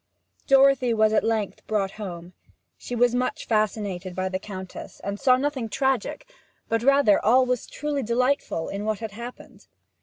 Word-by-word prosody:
Dorothy 270 -3 +5
was 215 0 +3
at 215 - +3
length 220 -3 -2
brought 200 -3 0
home; 180 -4 -8 0.4
she 245 - -6
was 240 0 +3
much 250 +1 -1
fascinated 205 -4 -1
by 185 +1 -1
the 185 0 -2
Countess, 190 -2 -9
and 200 +1 -4
saw 255 -2 +4
nothing 265 -4 -2
tragic, 265 - -1 0.4
but 225 0 0
rather 275 -4 +4
all 255 +4 +5
that - - -7
was 250 - -2
truly 295 -1 -3
delightful, 245 -7 0
in 200 +1 -4
what 215 0 -1
had 225 -1 -6
happened. 235 +4 -10
225 Hz, 170 wpm, -25 LUFS, 200-255 Hz, 0.4 s, Dorothy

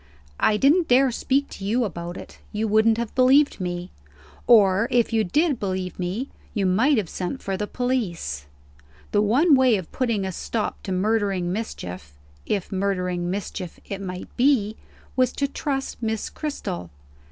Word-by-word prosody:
"I 210 - +3
didn't 310 - +4
dare 260 +1 +5
speak 270 +4 0
to - - -9
you 230 +5 +1
about 175 -3 -5
it; - - -11
you 220 +1 -1
wouldn't 220 +1 +4
have 235 -2 -3
believed 265 -1 +4
me. 175 0 -4 0.6
Or, 205 -2 +6
if 240 -2 +2
you 220 -1 +3
did 295 - +1
believe 185 -2 -3
me, 190 +10 -3 0.2
you 200 -3 +1
might 230 +10 +3
have 205 -5 0
sent 185 - -4
for 195 - -2
the 210 +2 -3
police. 185 - -2 0.6
The 205 - +3
one 270 +11 +4
way 260 -4 +5
of 185 -5 -5
putting 230 -6 0
a 190 - -2
stop 215 +4 -3
to 190 - -5
murdering 195 -2 +1
mischief 90 - -6 0.3
(if 195 -3 -1
murdering 180 -2 -1
mischief 185 -2 -5
it 200 -1 -5
might 180 -1 -7
be) 240 -5 +3 0.4
was 255 -1 +3
to 280 - 0
trust 275 -2 -3
Miss 220 -1 -2
Cristel. 90 - -4
210 Hz, 165 wpm, -24 LUFS, 185-250 Hz, 0.6 s, Or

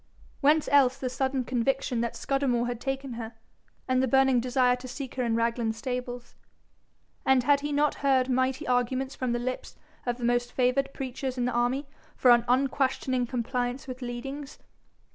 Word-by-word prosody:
Whence 300 +2 +3
else 270 -2 +5
the 260 -2 -3
sudden 265 0 -1
conviction 250 0 0
that 235 -1 -2
Scudamore 265 -4 0
had 240 -1 -4
taken 270 -1 -3
her, 225 +1 -7 0.5
and 255 0 +2
the 260 - +2
burning 265 0 +4
desire 250 0 +2
to 255 +1 -9
seek 260 +1 -6
her 255 - -2
in 230 -2 +1
Raglan 230 -1 0
stables? 245 0 -5 0.9
And 265 -2 +4
had 285 +1 +4
he 295 +1 -4
not 295 +1 +2
heard 265 -2 +3
mighty 260 0 0
arguments 255 +2 0
from 255 -2 -2
the 240 - +1
lips 255 +1 -4 0.3
of 240 0 0
the 245 - -8
most 240 0 +1
favoured 265 +2 +1
preachers 260 0 -4
in 245 - 0
the 250 - 0
army 245 +4 0 0.3
for 250 - +5
an 240 -1 +5
unquestioning 260 -1 +1
compliance 245 +1 -2
with 255 0 -7
leadings? 270 +4 -6
255 Hz, 175 wpm, -28 LUFS, 245-270 Hz, 0.9 s, else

